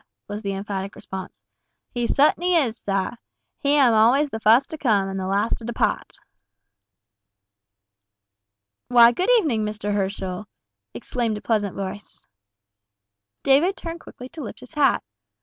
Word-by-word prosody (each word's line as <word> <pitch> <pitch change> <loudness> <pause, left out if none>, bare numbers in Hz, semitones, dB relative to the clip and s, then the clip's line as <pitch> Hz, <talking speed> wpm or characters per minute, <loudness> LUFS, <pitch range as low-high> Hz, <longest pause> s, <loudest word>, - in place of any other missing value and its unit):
was 205 +1 -5
the 200 -2 -3
emphatic 195 0 -5
response. 190 -1 -9 0.5
"He 240 -1 -2
sut'n'y 345 +7 +3
is, 230 -1 -6
sah! 195 -1 -1 0.5
He 285 +1 +2
am 265 -5 +5
always 250 +7 +4
the 220 - -4
fust 225 +5 +4
to 315 - -4
come, 210 -8 +2
an' 195 0 -4
the 190 -1 -3
last 200 +4 0
to - - -13
depaht." 235 +1 -2 2.7
"Why, 240 -1 +7
good 360 - -1
evening, 255 - 0
Mr. 210 -1 -3
Herschel," 195 0 -3 0.5
exclaimed 230 -4 -2
a - - -9
pleasant 210 -4 -1
voice. 200 +1 -7 1.2
David 305 +8 +3
turned 335 0 -6
quickly 250 -5 -11
to 320 - -9
lift 230 - -8
his 250 - -13
hat. 295 -2 +2
225 Hz, 140 wpm, -23 LUFS, 200-275 Hz, 2.7 s, Why